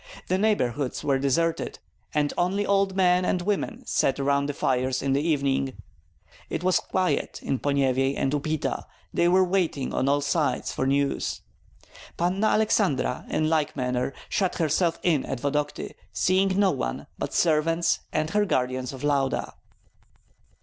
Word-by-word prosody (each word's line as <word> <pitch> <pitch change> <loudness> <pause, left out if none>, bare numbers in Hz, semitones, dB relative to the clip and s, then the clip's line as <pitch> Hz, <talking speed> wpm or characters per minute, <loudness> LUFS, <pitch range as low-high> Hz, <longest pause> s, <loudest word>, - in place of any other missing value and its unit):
The 185 +1 +2
neighborhoods 145 - 0
were 135 -2 +1
deserted, 160 +5 0 0.3
and 150 -2 0
only 190 +4 0
old 195 -1 +2
men 180 -1 +3
and 180 - +1
women 210 +5 -2
sat 135 0 +1
around 140 0 +1
the 145 - -2
fires 130 0 0
in 135 -1 +1
the 140 - +2
evening. 140 -4 0 0.8
It - - -3
was 185 0 +3
quiet 185 -6 -1
in 135 - -1
Ponyevyej 135 -1 +1
and 135 - 0
Upita; 155 +1 -2 0.3
they 170 - +3
were 185 +2 +5
waiting 175 -7 0
on 135 - +1
all 145 +1 +2
sides 145 +1 0
for 130 - -1
news. 140 0 0 0.8
Panna 185 +5 +1
Aleksandra 195 - +1
in 155 - +1
like 155 -2 +1
manner 125 -1 -1 0.2
shut 190 -3 0
herself 165 +1 +1
in 160 -6 +2
at 135 - -4
Vodokty, 145 +2 -2 0.2
seeing 190 +1 +2
no 195 -2 +4
one - - -3
but - - -3
servants 165 +1 +2
and 155 0 -1
her 210 0 +3
guardians 130 -7 -1
of 130 - -9
Lauda. 140 -2 0
150 Hz, 150 wpm, -26 LUFS, 135-180 Hz, 0.8 s, were